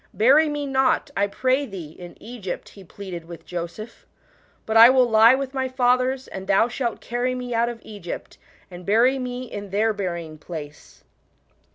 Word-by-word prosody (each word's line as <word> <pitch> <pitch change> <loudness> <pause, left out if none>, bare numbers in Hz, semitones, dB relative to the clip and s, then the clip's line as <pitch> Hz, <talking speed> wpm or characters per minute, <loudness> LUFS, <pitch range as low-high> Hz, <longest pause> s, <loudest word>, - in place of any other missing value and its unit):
" - - -41
Bury 300 +5 +6
me 295 -1 -3
not, 270 +1 +1
I 200 +1 +2
pray 260 +6 0
thee, 180 -8 -8
in 175 +2 -12
Egypt," 220 -6 -7
he 195 - -14
pleaded 180 -1 -8
wi+h 170 -1 -11
Joseph: 175 +6 -7 0.3
" - - -36
but 220 - -3
I 230 +2 +10
will 255 -1 +4
lie 225 +2 +6
with 270 0 -4
my 265 -1 -1
fathers, 255 +1 +1
and 190 0 -8
thou 200 +4 +4
shalt 240 -1 -3
carry 245 +2 -2
me 250 -1 -5
out 235 +1 +1
.of 235 -1 -7
Egypt, 200 -5 -8 0.3
and 180 0 -10
bury 240 +7 +3
me 250 0 -4
in 205 -5 -7
their 215 +3 +1
bury 180 -4 -3
ing 155 -1 -12
place.' 150 -3 -10
230 Hz, 190 wpm, -23 LUFS, 190-255 Hz, 0.3 s, I